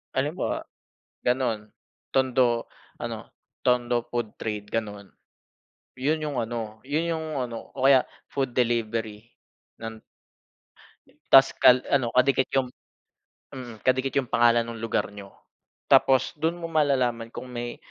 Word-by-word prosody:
Halimbawa - - -1 0.6
ganun, 120 -4 0 0.4
Tondo, 130 -3 +2 0.3
ano - - -4 0.5
Tondo 120 -1 +2
food 120 -3 -3
trade 105 -2 -4
gano'n. 105 -3 -3 0.9
Yun 150 +5 +1
yung 145 -4 -3
ano, 110 -2 -5
yun 160 +4 0
yung 160 -1 -4 0.2
ano 115 -1 -8
o 130 - -4
kaya 135 -2 +6 0.3
food 135 -3 -2
delivery. 115 -3 -1 0.6
Nan 115 0 -6 1.3
Tas 135 0 +8
kal 125 0 +7
ano 135 -4 +3
kadikit 130 +1 +4
yung, 130 -2 +1 0.8
mm, 120 -4 -9
kadikit 130 +1 +2
yung 135 - +2
pangalan 120 0 +4
nung 115 -1 -7
lugar 115 - 0
niyo. 100 -1 -10 0.6
Tapos 130 -1 +4
dun 160 +3 -1
mo 170 - -6
malalaman 130 -7 +1
kung 130 - -8
may 120 -1 -5
120 Hz, 125 wpm, -26 LUFS, 115-135 Hz, 1.3 s, Tas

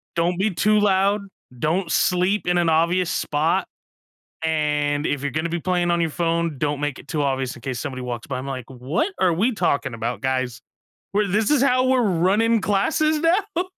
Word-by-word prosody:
Don't 170 +1 +1
be 210 +2 +1
too 210 +5 +3
loud. 200 0 +2 0.4
Don't 165 +6 -1
sleep 180 +4 +1
in 175 - +2
an 170 -1 +2
obvious 170 +2 +2
spot. 155 +2 0 0.8
And 150 -2 0
if 145 -1 -2
you're 145 - -1
gonna 155 +4 -2
be 170 0 -3
playing 175 -1 0
on 170 0 +1
your 165 -2 0
phone, 165 -2 -1
don't 145 -1 -1
make 145 -2 -2
it - - -14
too 150 -2 -1
obvious 135 -2 -1
in 120 - -14
case 130 -3 -4
somebody 130 +1 -5
walks 120 -2 -5
by." 130 -2 -4
I'm 130 - -6
like, 130 -3 -5
"What 135 - -2
are 185 -2 +4
we 210 +10 +1
talking 140 - 0
about, 115 +2 -3
guys? 130 -2 -2 0.5
We're 210 +1 +2
this 205 +3 +1
is 290 -3 +3
how 255 -1 +3
we're 255 -1 +3
running 205 +4 +2
classes 305 +11 +1
now?" 355 +2 +1
170 Hz, 195 wpm, -22 LUFS, 145-200 Hz, 0.8 s, are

